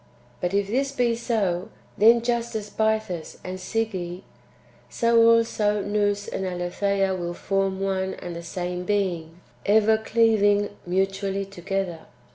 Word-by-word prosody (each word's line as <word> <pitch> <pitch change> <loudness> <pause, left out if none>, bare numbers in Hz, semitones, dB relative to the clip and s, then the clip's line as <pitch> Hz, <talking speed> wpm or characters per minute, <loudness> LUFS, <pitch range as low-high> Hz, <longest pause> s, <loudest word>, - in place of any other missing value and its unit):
But 180 +2 -1
if 200 0 +2
this 265 +7 0
be 245 -4 +1
so, 205 -7 -1 0.3
then 230 +2 +6
just 235 -1 -1
as 210 -1 -4
Bythus 220 -6 -1
and 185 0 -5
Sige, 185 -3 -3 0.7
so 230 0 +4
also 215 -3 +2
Nous 205 0 0
and 190 - -3
Aletheia 190 +2 0
will 175 -1 -4
form 195 0 -1
one 190 -1 -1
and 175 -1 -7
the 170 - -5
same 180 +1 -4
being, 175 -4 -2 0.2
ever 220 +1 +4
cleaving 215 -3 +3 0.2
mutually 195 +2 0
to 195 -2 -12
gether. 190 -2 -2
200 Hz, 135 wpm, -25 LUFS, 185-220 Hz, 0.7 s, then